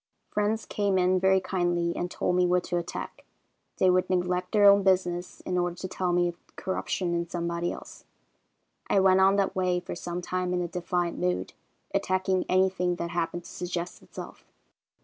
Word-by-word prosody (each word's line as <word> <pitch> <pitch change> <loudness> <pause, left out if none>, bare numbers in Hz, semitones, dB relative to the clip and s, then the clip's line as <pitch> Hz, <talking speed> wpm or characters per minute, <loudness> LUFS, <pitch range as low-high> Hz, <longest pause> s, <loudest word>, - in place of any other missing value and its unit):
"Friends 210 +2 0
came 200 -2 0
in 185 0 +3
very 190 +1 +4
kindly 175 -2 0
and 175 - -2
told 180 - -1
me 180 0 +3
what 180 0 +2
to 175 - -2
attack. 175 0 -5 0.5
They 190 - +3
would 185 0 +2
neglect 180 0 0
their 205 -1 +6
own 200 0 +7
business 180 -2 0
in 180 -1 -1
order 175 -1 -1
to 185 - -5
tell 185 -1 -1
me 175 0 +3
of 170 - -13
corruption 185 -1 -2
in 170 0 -2
somebody 170 0 -2
else. - - -10 0.8
I 200 - +4
went 190 0 +5
on 195 +1 +5
that 195 0 +1
way 180 -1 +1
for 175 - -7
some 175 0 -5
time 180 0 -1
in 180 - 0
a - - -2
defiant 175 0 -2
mood, 90 +1 -1 0.4
attacking 185 0 +1
anything 185 -1 +2
that 170 0 -4
happened 175 0 -2
to - - -11
suggest 175 0 -4
itself. - - -10
180 Hz, 185 wpm, -27 LUFS, 175-185 Hz, 0.8 s, own